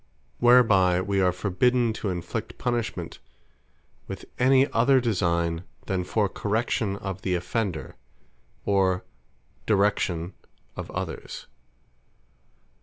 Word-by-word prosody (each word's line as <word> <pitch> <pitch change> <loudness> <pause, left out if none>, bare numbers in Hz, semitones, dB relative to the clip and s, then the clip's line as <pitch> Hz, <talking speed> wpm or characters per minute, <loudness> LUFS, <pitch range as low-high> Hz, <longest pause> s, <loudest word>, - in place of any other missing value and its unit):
Whereby 110 -8 +5
we 100 +1 0
are 90 -1 +4
forbidden 120 +5 +1
to 105 - -1
inflict 90 -2 -4
punishment 120 -2 -3 0.9
with - - -7
any 130 +1 +5
other 130 +4 +4
designe, 85 -7 0 0.2
than 95 -2 -1
for 105 +3 +1
correction 105 0 -1
of 95 -1 -5
the 90 -2 0
offender, 90 -1 -3 0.7
or 95 -2 +2 0.6
direction 95 -4 +1 0.4
of - - -6
others. - - -6
100 Hz, 100 wpm, -26 LUFS, 90-115 Hz, 0.9 s, Whereby